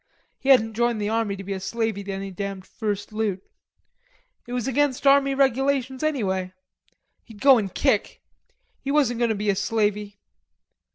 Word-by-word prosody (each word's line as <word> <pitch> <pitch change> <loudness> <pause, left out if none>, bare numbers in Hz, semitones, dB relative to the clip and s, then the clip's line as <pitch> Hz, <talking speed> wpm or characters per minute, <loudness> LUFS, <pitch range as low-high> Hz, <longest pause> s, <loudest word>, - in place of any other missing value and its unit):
He 270 - -3
hadn't 225 -4 +5
joined 235 0 0
the 205 0 -1
army 220 -3 0
to 195 - -8
be 195 +1 -4
a 190 - -4
slavey 220 +1 -2
to 200 - -4
any 195 0 -5
damned 195 0 -5
first 205 -1 -4
loot. 210 -4 -2 1.0
It 245 - -6
was 245 -1 -2
against 275 0 0
army 275 0 +5
regulations 270 -1 +1
anyway. 190 -12 -1 0.7
He'd 220 -3 -15
go 270 -1 +6
and 195 -3 -3
kick. - - 0 0.6
He 275 - -6
wasn't 275 -5 +2
going 235 -1 +2
to 220 - 0
be 205 0 0
a - - -2
slavey.... 210 -1 -1
220 Hz, 170 wpm, -24 LUFS, 200-265 Hz, 1.0 s, go